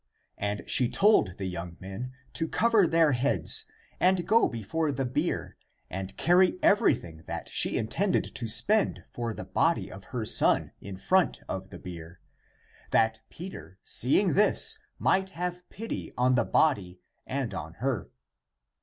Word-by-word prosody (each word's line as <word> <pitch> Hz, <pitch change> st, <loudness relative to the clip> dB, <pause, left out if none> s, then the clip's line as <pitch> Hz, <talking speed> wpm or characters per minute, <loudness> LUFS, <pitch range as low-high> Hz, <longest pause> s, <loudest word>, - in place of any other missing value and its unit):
And 105 Hz, +1 st, -3 dB
she 125 Hz, -2 st, +3 dB
told 195 Hz, -, +3 dB
the 95 Hz, -, -4 dB
young 85 Hz, -1 st, -6 dB
men 95 Hz, +7 st, -7 dB, 0.2 s
to 165 Hz, -, -2 dB
cover 225 Hz, 0 st, +3 dB
their 165 Hz, -2 st, +4 dB
heads 135 Hz, +2 st, +2 dB, 0.3 s
and 180 Hz, -1 st, +2 dB
go 225 Hz, +2 st, +4 dB
before 145 Hz, +8 st, -2 dB
the 135 Hz, -1 st, -2 dB
bier 125 Hz, -, -2 dB, 0.3 s
and 95 Hz, +1 st, -6 dB
carry 180 Hz, +2 st, +4 dB
everything 115 Hz, -, +2 dB
that -, -, -5 dB
she -, -, +1 dB
intended -, -, 0 dB
to 115 Hz, -, -3 dB
spend 205 Hz, -, +2 dB
for 120 Hz, -1 st, -3 dB
the -, -, -7 dB
body -, -, 0 dB
of -, -, -11 dB
her -, -, -4 dB
son -, -, +3 dB
in 95 Hz, -1 st, -8 dB
front 185 Hz, -, +1 dB
of 95 Hz, 0 st, -5 dB
the -, -, -9 dB
bier, 85 Hz, -1 st, -10 dB, 0.7 s
that 110 Hz, 0 st, +2 dB
Peter, 160 Hz, -, -10 dB
seeing 170 Hz, -, +2 dB
this, 210 Hz, +3 st, +3 dB, 0.2 s
might 190 Hz, 0 st, +1 dB
have 180 Hz, 0 st, -4 dB
pity 225 Hz, +2 st, -6 dB
on 125 Hz, +1 st, +3 dB
the 125 Hz, -, +2 dB
body 100 Hz, -, +1 dB, 0.3 s
and 130 Hz, -6 st, -3 dB
on 80 Hz, -3 st, -6 dB
her. 125 Hz, -7 st, -2 dB
125 Hz, 150 wpm, -28 LUFS, -, 0.7 s, their